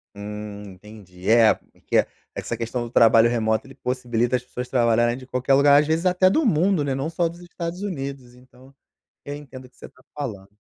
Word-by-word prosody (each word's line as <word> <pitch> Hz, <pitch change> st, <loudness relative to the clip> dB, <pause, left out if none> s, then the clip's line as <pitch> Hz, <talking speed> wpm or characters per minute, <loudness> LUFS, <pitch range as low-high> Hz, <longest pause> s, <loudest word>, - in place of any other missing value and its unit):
Hum, 105 Hz, 0 st, -7 dB
entendi. 95 Hz, -1 st, -10 dB
É, 115 Hz, -1 st, +6 dB
porque -, -, -4 dB
é, -, -, +1 dB, 0.3 s
essa 120 Hz, -, -4 dB
questão 120 Hz, +1 st, -3 dB
do 120 Hz, -, -7 dB
trabalho 115 Hz, -1 st, +5 dB
remoto, 110 Hz, -2 st, 0 dB
ele 135 Hz, -, -14 dB
possibilita 120 Hz, -1 st, -1 dB
as 125 Hz, -, -2 dB
pessoas 125 Hz, 0 st, -6 dB
trabalharem 120 Hz, -1 st, +2 dB
de 130 Hz, -, -11 dB
qualquer 130 Hz, +1 st, 0 dB
lugar, 140 Hz, +1 st, +6 dB
às 150 Hz, -, 0 dB
vezes 160 Hz, +3 st, 0 dB
até 185 Hz, +1 st, +4 dB
do 310 Hz, +10 st, +1 dB
mundo, 180 Hz, -4 st, +2 dB
né, 140 Hz, -1 st, -1 dB
não 135 Hz, +4 st, -2 dB
só 170 Hz, 0 st, 0 dB
dos 170 Hz, +1 st, -12 dB
Estados 175 Hz, 0 st, -6 dB
Unidos, 135 Hz, -9 st, -6 dB
então 130 Hz, +2 st, -20 dB, 0.5 s
eu 145 Hz, -, -6 dB
entendo 135 Hz, -3 st, -10 dB
o 125 Hz, -, -15 dB
que -, -, -32 dB
você -, -, -11 dB
está 130 Hz, -, -22 dB
falando. 105 Hz, -9 st, -6 dB
125 Hz, 210 wpm, -23 LUFS, 115-145 Hz, 0.5 s, É